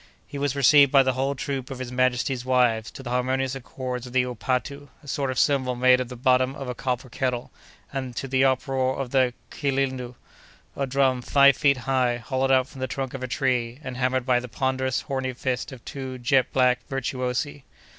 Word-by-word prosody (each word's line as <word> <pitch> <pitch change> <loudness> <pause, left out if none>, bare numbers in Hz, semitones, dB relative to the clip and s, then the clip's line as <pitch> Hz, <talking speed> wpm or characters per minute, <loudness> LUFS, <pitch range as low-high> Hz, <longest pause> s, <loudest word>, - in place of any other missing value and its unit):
He 140 - -7
was 140 -1 -1
received 140 0 +6
by 135 -2 +6
the 130 0 +1
whole 135 +2 -1
troop 135 -1 -4
of 135 - -6
his 130 -1 -6
majesty's 125 0 0
wives, 125 -4 +2
to 135 - -11
the 120 - -5
harmonious 130 +1 0
accords 125 -1 -5
of 125 - -11
the 130 -1 +3
"upatu," 130 +3 -3 0.2
a - - -15
sort 140 -1 -1
of 130 - -3
cymbal 130 -3 +2
made 125 +1 +5
of 125 -2 -3
the 125 - -7
bottom 130 +1 +2
of 135 -3 -6
a 125 - -3
copper 125 +1 -3
kettle, 125 -1 -3 0.4
and 130 -3 -4
to 135 - -4
the 130 0 +2
uproar 130 0 +1
of 135 -3 -4
the 130 -2 +2 0.2
"kilindo," 130 -3 -2 0.6
a 140 - -2
drum 130 -1 +2
five 140 +1 +5
feet 140 -2 +3
high, 125 -1 +1
hollowed 130 +2 -1
out 130 -1 +4
from 135 -1 -11
the 130 - -1
trunk 130 0 -4
of 135 - -6
a 130 - -3
tree, 125 -2 -1
and 130 -2 -6
hammered 130 0 0
by 125 -2 +3
the 125 0 -8
ponderous, 130 0 -1
horny 130 -2 -3
fists 130 +2 -3
of 130 -3 -12
two 130 -2 -6
jet 130 +1 +2
black 125 -1 +3
virtuosi. 135 +1 -2
130 Hz, 205 wpm, -25 LUFS, 125-135 Hz, 0.6 s, received